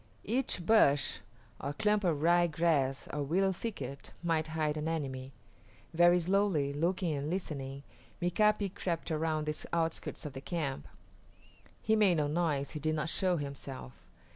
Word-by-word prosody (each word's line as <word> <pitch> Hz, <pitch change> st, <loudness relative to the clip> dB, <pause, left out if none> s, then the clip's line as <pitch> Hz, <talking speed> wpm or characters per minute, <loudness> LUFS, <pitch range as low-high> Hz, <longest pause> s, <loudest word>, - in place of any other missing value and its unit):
Each 225 Hz, -6 st, -1 dB
bush 145 Hz, -11 st, +4 dB, 0.4 s
or 140 Hz, +2 st, -3 dB
clump 210 Hz, +6 st, +2 dB
of 165 Hz, -5 st, +1 dB
rye 175 Hz, +1 st, +5 dB
grass 155 Hz, -5 st, +1 dB
or 150 Hz, -, -1 dB
willow 185 Hz, +7 st, +2 dB
thicket 140 Hz, -, -6 dB
might 160 Hz, -2 st, +1 dB
hide 155 Hz, -1 st, -1 dB
an 155 Hz, +1 st, -3 dB
enemy. 135 Hz, -5 st, -3 dB, 0.6 s
Very 175 Hz, +1 st, +6 dB
slowly, 180 Hz, -6 st, +1 dB
looking 170 Hz, +2 st, 0 dB
and 145 Hz, +1 st, -3 dB
listening, 140 Hz, -6 st, -4 dB, 0.4 s
Mika´pi 200 Hz, +2 st, +2 dB
crept 170 Hz, -2 st, -3 dB
around 155 Hz, -1 st, 0 dB
the 150 Hz, 0 st, -3 dB
outskirts 165 Hz, -1 st, -2 dB
of 145 Hz, -, -5 dB
the 135 Hz, -, -7 dB
camp. 140 Hz, -, -3 dB, 1.0 s
He 220 Hz, -, +3 dB
made 200 Hz, -6 st, +4 dB
no 150 Hz, -, +2 dB
noise, 145 Hz, -3 st, 0 dB
he 150 Hz, -, -5 dB
did 155 Hz, +1 st, 0 dB
not 155 Hz, +1 st, -1 dB
show 185 Hz, -2 st, +2 dB
himself. 140 Hz, -, -6 dB
160 Hz, 150 wpm, -32 LUFS, 145-180 Hz, 1.0 s, Very